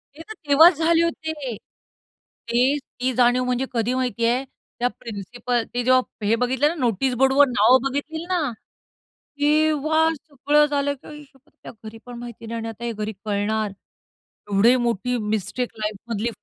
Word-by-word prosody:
ते 320 - -11
तर - - -5
तेव्हाच 320 +5 +7
झाले 330 +1 +3
होते. 315 -6 -3
ते 245 +5 -4
ती 255 -1 -4
जाणीव 245 +1 +3
म्हणजे 250 +1 0
कधी 235 +1 0
माहिती 250 -2 -1
आहे? 245 +3 +1 0.4
त्या 245 - +2
प्रिन्सिपल 235 +2 -3
ते 245 0 -1
जेव्हा 255 -3 +1
हे 220 +3 +3
बघितलं 260 +4 +2
ना 330 - -1
नोटीस 250 - 0
बोर्डवर 270 +2 +5
नावं 245 +2 +4
बघितली 315 +4 -4
ना, 365 -2 +1 1.0
तेव्हा 310 +1 +3
सगळं 295 0 +1
झालं 285 -1 0
की 280 - -16
आई 300 0 -10
शप्पथ 275 +2 -28
त्या - - -8
घरी 220 +1 -9
पण 245 -1 -9
माहिती 235 -1 -9
नाही 230 +1 -4
आणि 225 +1 -7
हे 235 - -2
घरी 215 0 -4
कळणार. 210 +1 -1 0.8
एवढी 215 +5 +5
मोठी 240 0 -1 0.2
मिस्टेक 220 +4 -2
लाईफमधली 215 +1 -3
250 Hz, 155 wpm, -23 LUFS, 230-290 Hz, 1.0 s, तेव्हाच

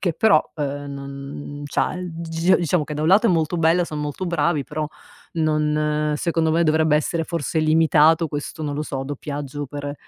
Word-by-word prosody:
che 175 -4 0
però, 210 -5 +4
ehm, 145 -1 -3
non 140 +1 -7
c'ha - - 0
il 180 -1 -5
d 165 0 -7
g 165 +3 +3
diciamo 170 -2 0
che 150 - -6
da 150 - -3
un 160 - +2
lato 210 +5 +5
è - - +4
molto 165 0 +1
bello, 165 +2 +3
son 155 -2 -5
molto 150 +5 -4
bravi, 170 -4 0
però 150 0 -3 0.5
non 150 -1 +1
secondo 165 0 0
me 165 +2 +3
dovrebbe 155 -1 +3
essere 165 +2 -1
forse 165 -1 -2
limitato 160 +1 +4
questo, 145 +2 -5
non 145 -1 -2
lo 150 - -3
so, 135 -3 -4
doppiaggio 145 0 -5
per, 145 +1 -5
155 Hz, 195 wpm, -22 LUFS, 145-165 Hz, 0.5 s, lato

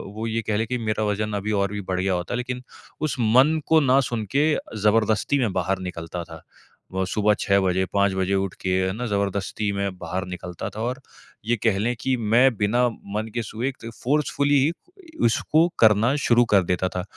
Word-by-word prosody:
वो 110 +1 -3
ये 115 0 -1
कह 105 - +1
ले 110 - 0
कि 125 +3 -2
मेरा 110 -2 -1
वज़न 105 0 -1
अभी 100 +1 -2
और 100 -1 0
भी 105 - -4
बढ़ 95 -1 -3
गया 95 0 +1
होता, 90 +7 -2
लेकिन 125 0 -4 0.4
उस 155 -4 -1
मन 130 +8 +4
को 160 - +5
ना 135 -1 +4
सुन 115 -3 -3
के 150 +2 +4 0.3
ज़बरदस्ती 110 +5 +2
में 115 -6 +1
बाहर 95 +1 -1
निकलता 90 -1 -5
था। 80 -1 -11 0.5
व 95 0 0
सुबह 105 +2 +2
6 100 0 +3
बजे, 95 0 +1
5 100 -1 +2
बजे 95 +1 0
उठ 95 -1 -1
के 95 - -2 0.2
है 95 - 0
ना 120 +4 -4
ज़बरदस्ती 100 0 -1
मैं 100 -2 -3
बाहर 95 +2 -4
निकलता 90 -1 -6
था 110 - -4
और 125 +3 -2 0.5
ये 120 +2 +2
कह 110 -4 +3
लें 120 +4 0
कि 130 -1 +1
मैं 120 +3 +3
बिना 120 +5 +2
मन 105 -1 -5
के 120 - -1
सुबह 115 +2 -5
फ़ोर्सफुली 145 +1 +2 0.5
उसको 155 +8 +3
करना 110 +4 +4
शुरू 120 0 +5
कर 100 -2 +6
देता 90 +1 0
था। 90 0 -4
105 Hz, 200 wpm, -24 LUFS, 95-120 Hz, 0.5 s, कर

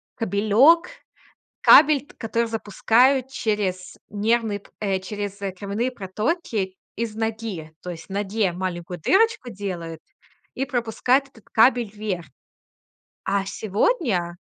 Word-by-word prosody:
кабелёк. 225 - +4 0.7
Кабель, 295 -3 +7
т - - -17
который 230 0 -1
запускают 240 +4 +2
через 200 -7 -2
нервные 215 0 0
п - - -22
э, 195 -2 0
через 200 +1 -5 0.2
кровяные 205 +6 -2
протоки 210 - -2 0.2
из 225 -1 -3
ноги. 220 -8 -4
То 180 - -7
есть 165 -1 -10
в - - -41
ноге 200 0 0
маленькую 175 -1 -5
дырочку 425 - +2
делают- 175 -6 -6 0.5
и 270 - -1
пропускают 250 +3 +1
этот 225 -5 -20
кабель 235 0 +4
вверх. 205 -5 -4 1.0
А 195 0 +1
сегодня 200 - 0
215 Hz, 115 wpm, -23 LUFS, 190-240 Hz, 1.0 s, Кабель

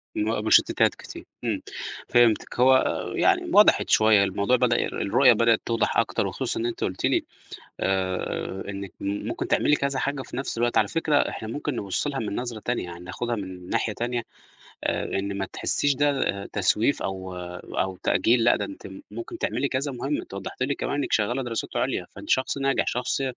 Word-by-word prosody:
م 110 0 -1
مُشتّتات - - +4
كتير، - - -10 0.2
إمم، - - -1 0.5
فهمتِك. 120 0 +3
هو 130 +1 +7 0.4
يعني - - +3
وضحت - - +6
شوية، 110 -2 +5
الموضوع 100 +5 +1
بدأ 125 -1 +2
الر - - -4
الرؤية 125 +5 +5
بدأت 115 0 +3
توضح 115 -1 0
أكتر - - +1
وخصوصًا - - -3
إن 115 - -1
أنتِ 120 - -3
قُلتِ 90 - -2
لي - - +2 0.6
آآ، 95 0 -1
إنِّك 100 -1 -6
م 100 +1 -3
ممكن - - -3
تعملي 150 - +3
كذا 140 -2 -1
حاجة 140 0 -1
في - - -8
نَفْس 135 -3 -3
الوقت، 120 +1 +1
على - - +4
فكرة 160 -3 0
إحنا 110 - 0
ممكن 145 +4 -3
نبُص 100 +5 -2
لها 140 -2 -2
من 105 -2 -3
نظرة 120 -3 -4
تانية، 120 0 -1
يعني 85 -1 -8
ناخُدها 120 +6 -3
من 95 -3 -7
ناحية 110 - 0
تانية 120 +1 -2 0.6
آآ - - 0
إن 100 0 -3
ما 95 - -1
تحسّيش 145 -1 +1
ده 135 -8 0
تسويف 105 +6 +1
أو 95 -1 -4 0.4
أو 95 0 0
تأجيل 115 0 +3
لأ، 120 - +5
ده - - -2
أنتِ 295 - -9 0.2
ممكن 345 0 -7
تعملي 140 - -1
كذا 135 +1 -2
مهمة. 135 +4 -2
أنتِ - - -11
وضّحتِ 100 +6 -5
لي 140 +2 +1
كمان - - -3
إنِّك 145 - -2
شغّالة 120 +5 +1
دراسات 115 -2 -4
عُليا، - - -1
فأنتِ - - -10
شخص 130 +1 +1
ناجح، 135 -1 +1
شخص 125 +2 -1
115 Hz, 185 wpm, -25 LUFS, 100-135 Hz, 0.6 s, هو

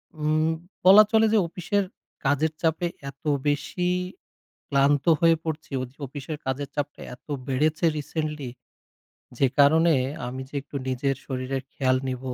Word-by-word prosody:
উম 155 +1 +1 0.4
বলা 195 +3 +10
চলে 225 -1 +5
যে - - +5
অফিসের 180 +4 -1 0.4
কাজের 145 +3 +2
চাপে 165 +1 +1 0.2
এত 140 +4 -15 0.2
বেশি 150 +5 0 0.8
ক্লান্ত 140 0 +3 0.2
হয়ে 165 -1 +6
পড়ছি। 160 -2 -5
উজ 125 - -8 0.2
অফিসের 145 +3 -6
কাজের 130 +2 -2
চাপটা 145 0 -3
এত 125 - -33 0.2
বেড়েছে 150 +5 +1
রিসেন্টলি 150 -2 -3 0.9
যে 140 - +5
কারণে 160 +3 +6 0.3
আমি 130 +2 -5
যে - - -31
একটু 145 +1 -14
নিজের 135 +2 0
শরীরের 130 0 -3
খেয়াল 130 -1 +2
নিবো, 130 0 -4
145 Hz, 135 wpm, -25 LUFS, 135-160 Hz, 0.9 s, বলা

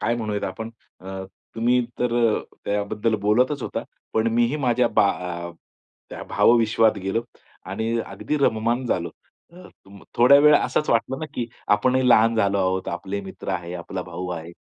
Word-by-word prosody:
काय 120 - +1
म्हणूयात 105 -3 -3
आपण? 110 +5 -5 0.3
अ, 95 +1 -7 0.3
तुम्ही 120 +2 +2 0.2
तर 125 -1 0 0.5
त्याबद्दल 105 +2 -1
बोलतचं 125 +6 +2
होता. - - -4 0.3
पण 110 0 +1
मीही 120 +5 +2
माझ्या 125 -1 +2
बा 100 - +3 1.0
त्या - - -7
भावविश्वात 115 -2 +3
गेलो 110 +4 0 0.5
आणि 110 - -2 0.2
अगदी 150 - -3
रममाण 120 -1 +1
झालो. 85 -6 -1 0.4
अ, 180 +1 -13
तुम 100 0 -17
थोड्या 125 +4 +7
वेळ 150 0 +7
असंच 150 - 0
वाटलं 120 +4 +1
ना, 155 - -3
की 120 -1 -3 0.2
आपणही 125 +5 +3
लहान 115 0 +5
झालो 100 -2 +2
आहोत, 95 0 0
आपले 95 +4 -4
मित्र 95 -1 -10
आहे, 90 0 -4
आपला 85 - -5
भाऊ 90 0 -6
आहे, 85 -1 -6
110 Hz, 155 wpm, -23 LUFS, 100-120 Hz, 1.0 s, थोड्या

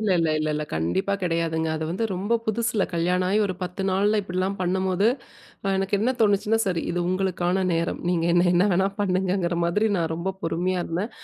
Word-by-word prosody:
இல்ல, 215 -2 0
இல்ல, 165 -1 +2
இல்ல, 155 0 -1
இல்ல. 150 0 -2
கண்டிப்பா 85 - 0
கிடையாதுங்க. 165 -2 0
அது 160 - -3
வந்து 185 +7 -1
ரொம்ப 200 +6 -1
புதுசுல 225 -1 0
கல்யாணம் 180 +2 +1
ஆகி 210 - +3
ஒரு 185 - -3
10 180 +2 -4
நால்ல 205 +3 +2
இப்பிடிலாம் 190 +1 -2
பண்ணும்போது 190 +2 +1 0.6
அ 195 - +2
எனக்கு 195 +1 0
என்ன 235 +5 +1
தோணுச்சுன்னா, 210 +1 +3
சரி 180 -4 0
இது 175 - -2
உங்களுக்கான 185 0 0
நேரம். 165 0 -1
நீங்க 170 -2 +1
என்ன 175 0 +4
என்ன 180 +2 +4
வேணா 190 +2 +3
பண்ணுங்கங்கிற 185 -2 0
மாதிரி 205 +6 +2
நான் 165 -2 -1
ரொம்ப 185 +3 -3
பொறுமையா 180 +2 -1
இருந்தேன். 185 +8 -3
185 Hz, 185 wpm, -24 LUFS, 170-195 Hz, 0.6 s, என்ன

